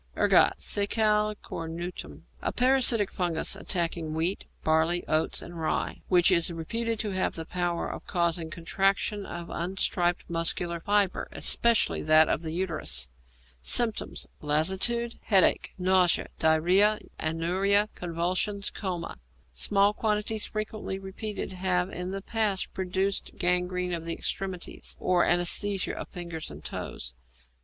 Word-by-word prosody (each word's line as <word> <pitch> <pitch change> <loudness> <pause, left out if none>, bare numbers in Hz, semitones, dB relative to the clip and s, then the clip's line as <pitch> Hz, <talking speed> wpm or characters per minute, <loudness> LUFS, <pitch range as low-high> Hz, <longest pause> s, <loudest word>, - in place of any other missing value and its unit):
=Ergot= - - +5
(Secale 210 +1 +1
Cornutum). 165 +2 -6 0.2
A - - -1
parasitic 250 -5 +3
fungus 175 -3 -1
attacking 165 -3 -2
wheat, 170 +5 -1 0.2
barley, 160 +2 +2
oats, 155 +1 0
and 175 -1 -9
rye, 160 - -2
which 180 0 +4
is 170 -1 +3
reputed 230 +8 -2
to 210 -1 -2
have 185 0 -1
the 165 - -5
power 175 0 -2
of - - -7
causing 170 -2 0
contraction 195 +5 0
of 170 -1 -7
unstriped 175 0 0
muscular 170 0 -1
fibre, 205 +1 +1
especially 235 -2 +2
that 155 0 +5
of - - 0
the 160 - -5
uterus. 165 - -2 0.5
Symptoms. 225 - +1 0.2
Lassitude, 190 +11 +1
headache, 195 -4 +4
nausea, 185 -1 +3
diarrhoea, 180 +7 +4 0.2
anuria, 185 +6 +2
convulsions, 180 +4 -2
coma. 175 - -5 0.3
Small 200 - +3
quantities 210 0 -1
frequently 215 -2 -4
repeated 195 +2 -5
have 180 0 0
in 180 +1 -4
the 195 0 -5
past 210 -4 -1
produced 190 +1 -2
gangrene 180 0 +1
of 165 -1 -2
the 165 - -1
extremities, 190 -1 -4
or 180 -1 +2
anæsthesia 185 +3 +3
of - - -6
fingers 170 -3 -6
and - - -11
toes. 60 - -5
180 Hz, 125 wpm, -28 LUFS, 170-200 Hz, 0.5 s, =Ergot=